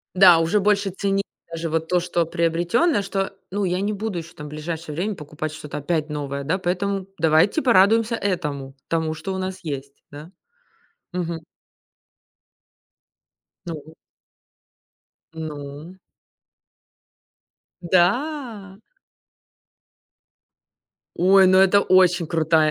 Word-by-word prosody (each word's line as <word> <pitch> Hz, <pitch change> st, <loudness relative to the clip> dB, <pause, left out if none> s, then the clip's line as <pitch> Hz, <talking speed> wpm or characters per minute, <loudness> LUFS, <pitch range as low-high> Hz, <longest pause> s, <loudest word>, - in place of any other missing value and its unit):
Да, 180 Hz, -3 st, +8 dB
уже 165 Hz, +6 st, +2 dB
больше 200 Hz, 0 st, +2 dB
цени 195 Hz, +1 st, -1 dB, 0.3 s
даже 165 Hz, 0 st, -4 dB
вот 160 Hz, 0 st, -1 dB
то, 180 Hz, -, +3 dB
что 175 Hz, -1 st, -1 dB
приобретённое, 175 Hz, -, +1 dB
что, 195 Hz, 0 st, -3 dB, 0.2 s
ну, 200 Hz, +1 st, -1 dB
я 180 Hz, 0 st, 0 dB
не 205 Hz, +2 st, -1 dB
буду 205 Hz, -2 st, -3 dB
ещё 170 Hz, +1 st, -9 dB
там 150 Hz, -3 st, -8 dB
ближайшее 155 Hz, +1 st, -6 dB
время 195 Hz, +6 st, -2 dB
покупать 155 Hz, -1 st, -6 dB
что-то 150 Hz, -1 st, -7 dB
опять 155 Hz, +1 st, -2 dB
новое, 140 Hz, -1 st, -4 dB
да, 165 Hz, +7 st, 0 dB
поэтому 190 Hz, +1 st, -2 dB
давайте 160 Hz, -, +3 dB
порадуемся 225 Hz, 0 st, +4 dB
этому, 150 Hz, -10 st, -3 dB
тому, 160 Hz, -1 st, -1 dB
что 175 Hz, +5 st, -5 dB
у 190 Hz, -, -3 dB
нас 185 Hz, 0 st, -4 dB
есть, 140 Hz, -2 st, -5 dB, 0.2 s
да, 150 Hz, +4 st, -10 dB, 0.8 s
мгм. 170 Hz, -2 st, -3 dB, 2.3 s
Ну. 160 Hz, -1 st, -8 dB, 1.4 s
Ну. 155 Hz, +2 st, -8 dB, 1.8 s
Да. 200 Hz, -, 0 dB, 2.4 s
Ой, 190 Hz, +2 st, +6 dB
ну, 185 Hz, 0 st, +5 dB
это 195 Hz, +1 st, +5 dB
очень 180 Hz, -3 st, +4 dB
крутая 160 Hz, -1 st, +2 dB
175 Hz, 110 wpm, -22 LUFS, 155-195 Hz, 2.4 s, Да